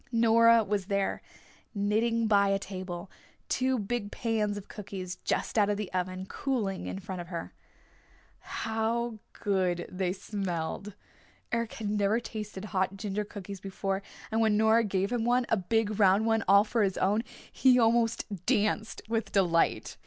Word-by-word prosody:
Nora 230 0 +5
was 200 -2 -2
there 200 -1 0 0.5
knitting 225 +3 +1
by 200 -2 +4
a 195 - +3
table, 185 -2 -6 0.4
two 260 0 +1
big 210 -1 -3
pans 215 -3 -1
of 205 - -8
cookies 190 -3 -6
just - - -1
out 205 -1 +4
of 205 - 0
the 210 -3 -5
oven 185 0 -2
cooling 210 -5 -2
in - - -4
front 190 -2 -6
of 170 - -9
her. 170 -1 -6 0.9
How 225 +1 -2
good 185 -3 0
they 185 -1 -1
smelled! 190 0 -4 0.6
Eric 230 -1 -1
had 210 -2 -3
never 210 +2 +2
tasted 210 -4 -6
hot 190 -1 -1
ginger 205 0 -2
cookies 200 -2 -8
before, 195 0 -2 0.3
and 225 +1 +2
when 215 -2 +3
Nora 220 +1 +4
gave 195 0 0
him 240 -2 0
one, 245 +1 +2
a 225 - +3
big 215 +2 0
round 200 +2 +5
one 225 -1 +2
all 200 +1 +7
for 225 +1 0
his 195 -2 +1
own, 205 +4 +2 0.3
he 255 -2 +5
almost 230 0 +3 0.2
danced 215 -2 +1
with 225 -2 -1
delight. 175 -4 +2
205 Hz, 160 wpm, -29 LUFS, 195-225 Hz, 0.9 s, all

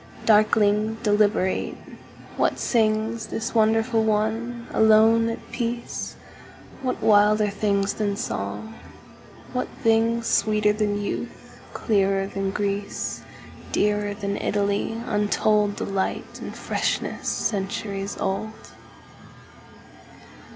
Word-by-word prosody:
Darkling, 215 0 +3
deliberate, 205 -3 +1 0.6
what - - +1
singsThis 220 0 0
wonderful 225 +1 +3
one, 220 +2 -1
alone, 220 +1 +5
at 230 - -7
peace? 235 0 -4 0.7
What 255 -2 -3
wilder 210 0 +4
things 200 -1 0
than 205 -2 -1
song, 100 - -4 0.8
what 250 0 -1 0.2
thingsSweeter 225 -2 +2
than 205 -1 0
youth, 205 - -6 0.2
clearer 195 -3 +1
than 195 0 -3
Greece, 200 0 -3 0.5
Dearer 205 0 +1
than 200 -1 -3
Italy, 205 +2 -1
untoldDelight, 205 -2 0
and - - -7
freshness - - -2
centuries 200 -1 -2
old? 215 +3 -4
210 Hz, 85 wpm, -24 LUFS, 205-225 Hz, 0.8 s, alone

